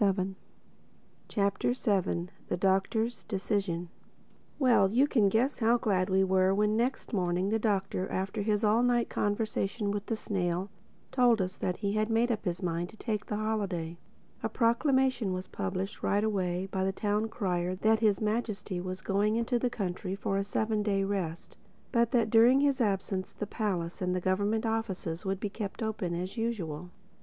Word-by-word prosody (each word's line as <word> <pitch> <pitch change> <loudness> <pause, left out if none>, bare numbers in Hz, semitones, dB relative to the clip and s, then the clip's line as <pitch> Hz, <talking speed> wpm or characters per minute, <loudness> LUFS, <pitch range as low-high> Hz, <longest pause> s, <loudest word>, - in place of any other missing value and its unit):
THE 205 - +5
SEVENTH 190 0 -1 0.9
CHAPTER 200 +3 +1 0.7
THE 180 - -1
DOCTOR'S 195 +5 +1
DECISION 190 -4 -2 0.7
WELL, 245 -8 +4
you 250 +7 +4
can 225 -9 +3
guess 245 +8 +1
how 235 +1 +4
glad 195 -5 +1
we 190 0 +4
were 190 0 +3
when 210 +1 +2
next 240 +2 -1
morning 180 -1 +1
the 225 +1 +1
Doctor, 195 -3 0
after 190 +3 -2
his 210 +1 +1
all 215 +2 +4
night 245 -1 +2
conversation 205 0 -1
with 205 0 -3
the 225 - 0
snail, 185 -2 -2 0.4
told 245 -3 +4
us 185 -1 -1
that 180 - -2
he 200 -1 -1
had 215 +1 +1
made 230 +2 +2
up 215 -1 -2
his 175 +1 -2
mind 170 0 -1
to 220 - -15
take 215 -3 -3
the 210 - -2
holiday. 200 -6 -2 0.5
A - - -1
proclamation 250 -3 +2
was 185 +1 -4
published 195 -1 -4
right 205 +1 +1
away 185 -4 0
by 190 -1 0
the 190 - +1
Town 210 +2 0
Crier 185 -5 -1
that 220 +3 +3
His 215 -3 +3
Majesty 210 -4 -2
was 185 +1 -5
going 205 +2 +1
into 235 +1 +1
the 250 - +1
country 190 -3 -3
for 195 0 -2
a 195 - +1
seven 215 +1 0
day 200 -2 +1
rest, 185 -5 -3 0.3
but 235 -2 +3
that 230 -4 +2
during 240 +4 +6
his 280 -2 +2
absence 195 -3 -1
the 210 - -4
palace 190 -6 -2
and 180 0 0
the - - +1
government 205 +5 0
offices 210 -6 -2
would 195 0 -1
be 210 - -2
kept 210 +2 -5
open 205 -6 -2
as 185 +5 -4
usual. 180 -8 -3
205 Hz, 175 wpm, -30 LUFS, 185-225 Hz, 0.9 s, during